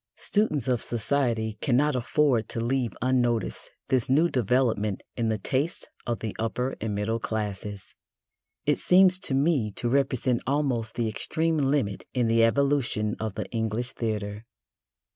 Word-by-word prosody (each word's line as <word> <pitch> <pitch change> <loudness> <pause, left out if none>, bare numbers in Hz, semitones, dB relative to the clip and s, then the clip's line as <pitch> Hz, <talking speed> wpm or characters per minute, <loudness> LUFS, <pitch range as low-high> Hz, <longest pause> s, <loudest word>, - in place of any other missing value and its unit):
Students 155 - 0
of 125 -2 +1
society 115 -2 -1
cannot 145 +2 +2
afford 125 -2 +1
to - - -4
leave 120 0 -1
unnoticed 120 -4 0 0.2
this 130 -3 +1
new 155 +6 +4
development 115 -4 +1
in 115 -2 0
the 110 - 0
tastes 135 +10 -2 0.2
of 120 -1 -2
the 110 -2 -4
upper 125 +4 -1
and 105 -1 -2
middle 110 +3 -1
classes. 105 -3 -4 0.7
It 150 - +2
seems 185 0 +5
to 135 - -1
me 140 -5 +2
to 120 - -3
represent 130 -2 +1
almost 130 -6 0
the 115 -2 0
extreme 160 +8 -1
limit 135 -8 0
in 125 -2 +2
the 115 0 +4
evolution 120 -4 +1
of 110 -3 -3
the 105 - -3
English 115 +2 -1
theatre. 105 -1 -4
120 Hz, 145 wpm, -27 LUFS, 110-135 Hz, 0.7 s, seems